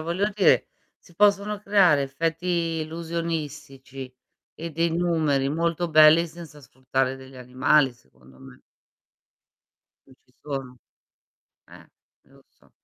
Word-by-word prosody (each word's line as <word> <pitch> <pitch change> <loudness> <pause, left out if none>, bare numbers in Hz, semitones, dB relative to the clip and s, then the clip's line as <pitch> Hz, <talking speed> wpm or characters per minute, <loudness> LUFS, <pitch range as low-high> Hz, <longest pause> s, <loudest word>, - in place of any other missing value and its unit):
voglio 175 +6 -1
dire, 205 - +3 0.3
si 175 - -22
possono 205 +1 +2
creare 195 -8 +3
effetti 165 +3 -2
illusionistici, 150 -5 -6 0.4
e 165 +1 -6
dei 165 +2 0
numeri 160 -6 0
molto 170 +2 -1
belli, 155 +2 +6
senza 160 -2 -12
sfruttare 130 0 -3
degli 130 0 -14
animali, 130 +2 +2
secondo 65 - -23
me. 65 -1 -15 1.5
Non 130 - -20
ci 125 0 -33
sono. 135 -3 -6 0.9
Eh, - - -16 0.3
e - - -32
lo - - -22
so. - - -30
155 Hz, 115 wpm, -24 LUFS, 135-170 Hz, 1.5 s, belli